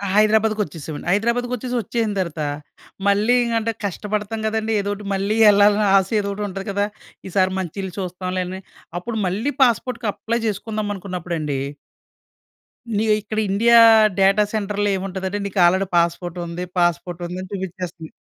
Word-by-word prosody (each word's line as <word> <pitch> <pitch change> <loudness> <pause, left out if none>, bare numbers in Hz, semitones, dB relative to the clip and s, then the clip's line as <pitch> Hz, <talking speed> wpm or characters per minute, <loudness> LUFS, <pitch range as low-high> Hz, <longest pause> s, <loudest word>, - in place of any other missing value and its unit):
హైదరాబాద్‌కి 215 0 +3
వచ్చేశామండి. 155 -2 -8
హైదరాబాద్‌కి 235 +5 +1
వచ్చేసి 250 +1 -4
వచ్చేసిన 225 +1 -1
తరువాత, 170 -4 -3 0.7
మళ్ళీ 205 +4 +3
ఇంగా 235 -1 -1
అంటే 225 +1 -1
కష్టపడతాం 210 +3 -3
కదండీ! 220 0 -1
ఏదో 200 - -3
ఒకటి 205 0 -9
మళ్ళీ 200 +3 0
ఎళ్ళాలని 205 +1 +4
ఆశ 190 -1 +1
ఎదో 200 -1 -2
ఒకటి 205 +1 -3
ఉంటది 195 +1 -6
కదా! 200 +1 +1 0.4
ఈ - - -6
సారి 185 0 +3
మంచి 185 -1 -5
ఇల్లు 190 -2 -6
చూస్తాంలే 185 0 -3
అని 190 +1 -6 0.4
అప్పుడు 225 +5 -5
మళ్ళీ 215 +10 -1
పాస్‌పోర్ట్‌కి 240 -1 0
అప్లై 225 +3 -2
చేసుకుందాం 215 0 -3
అనుకున్నప్పుడండి! 170 -7 -4 1.4
ఇగ 220 - 0
ఇక్కడ 215 +1 -3
ఇండియా 230 +4 +5 0.4
డేటా 195 +2 +5
సెంటర్‌లో 205 -1 -1
ఏముంటదంటే 190 +1 -4
నీకు 200 -1 -3
ఆల్రెడీ 190 +3 +3
పాస్‌పోర్ట్ 170 +1 0
ఉంది, 170 +1 -5 0.2
పాస్‌పోర్ట్ 175 0 0
ఉంది 180 +1 -6
అని 185 - -9
చూపించేస్తంది. 180 -3 -6
200 Hz, 150 wpm, -21 LUFS, 185-215 Hz, 1.4 s, ఇండియా